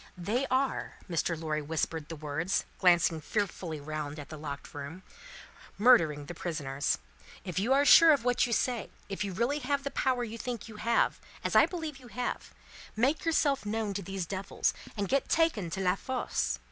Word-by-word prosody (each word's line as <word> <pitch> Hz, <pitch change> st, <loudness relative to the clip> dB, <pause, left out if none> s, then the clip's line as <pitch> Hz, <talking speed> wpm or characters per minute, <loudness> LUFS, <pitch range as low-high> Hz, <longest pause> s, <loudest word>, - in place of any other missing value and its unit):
"They 225 Hz, +10 st, -1 dB
are," 265 Hz, +1 st, 0 dB
Mr. 165 Hz, -1 st, -1 dB
Lorry 155 Hz, -1 st, -1 dB
whispered 160 Hz, +1 st, -2 dB
the 165 Hz, -, -5 dB
words, 155 Hz, +5 st, -1 dB
glancing 175 Hz, -3 st, +4 dB
fearfully 175 Hz, -4 st, -2 dB
round 150 Hz, 0 st, -5 dB
at 145 Hz, -2 st, -8 dB
the 155 Hz, -, -7 dB
locked 140 Hz, -2 st, -7 dB
room, 145 Hz, +6 st, -7 dB, 0.7 s
"murdering 165 Hz, -, +5 dB
the 175 Hz, -, -7 dB
prisoners. 145 Hz, -5 st, -2 dB, 0.5 s
If 185 Hz, -1 st, -2 dB
you 225 Hz, +7 st, 0 dB
are 280 Hz, +2 st, +5 dB
sure 330 Hz, +3 st, +9 dB
of 280 Hz, -6 st, +3 dB
what 245 Hz, 0 st, +2 dB
you -, -, -5 dB
say; 240 Hz, -1 st, 0 dB, 0.2 s
if 195 Hz, 0 st, -2 dB
you 200 Hz, -, -3 dB
really 235 Hz, +10 st, 0 dB
have 280 Hz, +1 st, -1 dB
the 280 Hz, -, -3 dB
power 255 Hz, -2 st, +1 dB
you 230 Hz, 0 st, -6 dB
think 235 Hz, 0 st, -4 dB
you 220 Hz, -2 st, -10 dB
have 230 Hz, +2 st, +2 dB, 0.2 s
as -, -, -1 dB
I -, -, +7 dB
believe 320 Hz, -5 st, -5 dB
you 255 Hz, -2 st, -14 dB
have 245 Hz, +1 st, -4 dB, 0.4 s
make 265 Hz, +10 st, +1 dB
yourself 295 Hz, -5 st, +2 dB
known 210 Hz, 0 st, -2 dB
to 200 Hz, -, -3 dB
these 195 Hz, -1 st, -4 dB
devils, 190 Hz, +3 st, -1 dB, 0.2 s
and 200 Hz, -1 st, -1 dB
get 275 Hz, +5 st, +1 dB
taken 315 Hz, -, +2 dB
to 180 Hz, -, -4 dB
La 180 Hz, -1 st, +3 dB
Force. 220 Hz, -, -2 dB
200 Hz, 185 wpm, -30 LUFS, 160-250 Hz, 0.7 s, sure